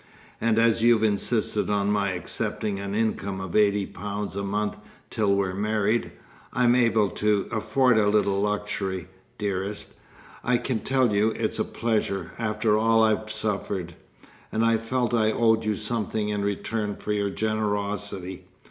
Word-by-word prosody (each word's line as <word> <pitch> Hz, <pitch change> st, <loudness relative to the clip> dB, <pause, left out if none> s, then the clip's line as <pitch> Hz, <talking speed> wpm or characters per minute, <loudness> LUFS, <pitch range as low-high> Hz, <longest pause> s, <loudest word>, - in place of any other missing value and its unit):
And 115 Hz, -1 st, +2 dB
as 115 Hz, -1 st, +3 dB
you've 115 Hz, -1 st, +4 dB
insisted 105 Hz, -2 st, +1 dB
on 100 Hz, 0 st, +1 dB
my 100 Hz, -2 st, +1 dB
accepting 100 Hz, +2 st, -3 dB
an 100 Hz, 0 st, -4 dB
income 100 Hz, -3 st, -1 dB
of 95 Hz, -2 st, -6 dB
eighty 105 Hz, -1 st, +3 dB
pounds 100 Hz, +1 st, -5 dB
a 100 Hz, -, -2 dB
month 105 Hz, +1 st, -2 dB, 0.3 s
till 105 Hz, -3 st, +2 dB
we're 95 Hz, -2 st, 0 dB
married, 105 Hz, +3 st, 0 dB, 0.4 s
I'm 125 Hz, -1 st, +4 dB
able 115 Hz, -5 st, +3 dB
to 105 Hz, -2 st, +1 dB
afford 125 Hz, +1 st, +2 dB
a 105 Hz, -1 st, +3 dB
little 100 Hz, -2 st, +2 dB
luxury, 100 Hz, -3 st, -2 dB, 0.3 s
dearest. 100 Hz, 0 st, -3 dB, 0.5 s
I 125 Hz, 0 st, +3 dB
can 120 Hz, -1 st, -2 dB
tell 130 Hz, -3 st, +1 dB
you 105 Hz, +2 st, +3 dB
it's -, -, -2 dB
a -, -, +3 dB
pleasure, 105 Hz, -6 st, -2 dB
after 110 Hz, -1 st, +1 dB
all 115 Hz, +1 st, +4 dB
I've 110 Hz, 0 st, +1 dB
suffered! 100 Hz, -5 st, -3 dB, 0.6 s
and 110 Hz, +1 st, +1 dB
I 115 Hz, 0 st, +4 dB
felt 120 Hz, +1 st, -1 dB
I 110 Hz, -2 st, +3 dB
owed 115 Hz, 0 st, +2 dB
you 105 Hz, -2 st, 0 dB
something 110 Hz, -1 st, -1 dB
in 105 Hz, -1 st, -1 dB
return 105 Hz, +1 st, -2 dB
for 105 Hz, -, -5 dB
your 100 Hz, -1 st, 0 dB
generosity. 100 Hz, -3 st, -2 dB
105 Hz, 155 wpm, -25 LUFS, 100-110 Hz, 0.6 s, you've